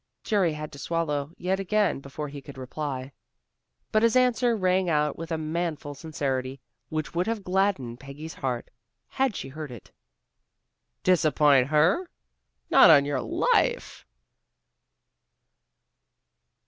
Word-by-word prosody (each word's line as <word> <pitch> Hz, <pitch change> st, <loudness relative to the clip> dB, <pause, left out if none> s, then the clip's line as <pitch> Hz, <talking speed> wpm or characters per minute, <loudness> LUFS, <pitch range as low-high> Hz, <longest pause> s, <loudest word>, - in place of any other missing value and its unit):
Jerry 190 Hz, -7 st, +1 dB
had 150 Hz, 0 st, -6 dB
to 140 Hz, -, -11 dB
swallow 150 Hz, -3 st, -2 dB
yet 190 Hz, +2 st, -1 dB
again 205 Hz, -3 st, +1 dB
before 140 Hz, +2 st, -6 dB
he 140 Hz, 0 st, -8 dB
could 135 Hz, 0 st, -12 dB
reply. 130 Hz, 0 st, -5 dB, 0.8 s
But 215 Hz, -, +3 dB
his 230 Hz, +1 st, +3 dB
answer 245 Hz, -1 st, +3 dB
rang 185 Hz, -1 st, +1 dB
out 150 Hz, -2 st, +1 dB
with 165 Hz, +1 st, -7 dB
a 160 Hz, -, 0 dB
manful 155 Hz, -2 st, -3 dB
sincerity 135 Hz, -3 st, -3 dB, 0.3 s
which 155 Hz, -1 st, -3 dB
would 175 Hz, +3 st, 0 dB
have 225 Hz, -3 st, -2 dB
gladdened 180 Hz, -11 st, 0 dB
Peggy's 140 Hz, +4 st, -9 dB
heart 125 Hz, -3 st, -4 dB, 0.4 s
had 265 Hz, -6 st, 0 dB
she 135 Hz, -, -5 dB
heard 150 Hz, +2 st, -7 dB
it. 120 Hz, -5 st, -12 dB, 1.1 s
"Disappoint 150 Hz, -6 st, +4 dB
her! 160 Hz, -, +2 dB, 0.6 s
Not -, -, +8 dB
on 140 Hz, -1 st, +7 dB
your 145 Hz, -2 st, -1 dB
life!" 485 Hz, +7 st, 0 dB
155 Hz, 125 wpm, -26 LUFS, 140-190 Hz, 1.1 s, Not